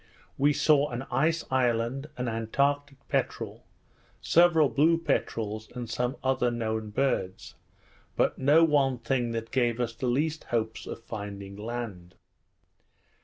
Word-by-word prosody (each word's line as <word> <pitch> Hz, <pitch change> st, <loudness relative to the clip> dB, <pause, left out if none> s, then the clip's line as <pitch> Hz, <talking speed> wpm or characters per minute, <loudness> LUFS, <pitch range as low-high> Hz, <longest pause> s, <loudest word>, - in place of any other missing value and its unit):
we 145 Hz, +2 st, +3 dB
saw 150 Hz, 0 st, +3 dB
an 120 Hz, +1 st, -4 dB
ice 160 Hz, +4 st, +1 dB
island, 125 Hz, +2 st, +1 dB
an 125 Hz, -, -2 dB
antartic 140 Hz, +5 st, 0 dB
peterel, -, -, -2 dB, 0.6 s
several 165 Hz, -3 st, +5 dB
blue 160 Hz, +5 st, +3 dB
peterels, 110 Hz, -9 st, -2 dB
and 120 Hz, -2 st, -5 dB
some 125 Hz, +3 st, -1 dB
other 130 Hz, -2 st, +2 dB
known 110 Hz, -2 st, -2 dB
birds; 105 Hz, -5 st, -1 dB, 0.6 s
but -, -, +2 dB
no 145 Hz, +5 st, +5 dB
one 140 Hz, -5 st, +3 dB
thing 120 Hz, 0 st, -1 dB
that 115 Hz, -1 st, -4 dB
gave 120 Hz, -2 st, +1 dB
us 120 Hz, -2 st, -1 dB
the 125 Hz, -, -3 dB
least 150 Hz, +6 st, 0 dB
hopes 110 Hz, -1 st, -2 dB
of 115 Hz, -, -7 dB
finding 100 Hz, -3 st, -7 dB
land. 105 Hz, -5 st, -6 dB
125 Hz, 130 wpm, -28 LUFS, 115-140 Hz, 0.6 s, several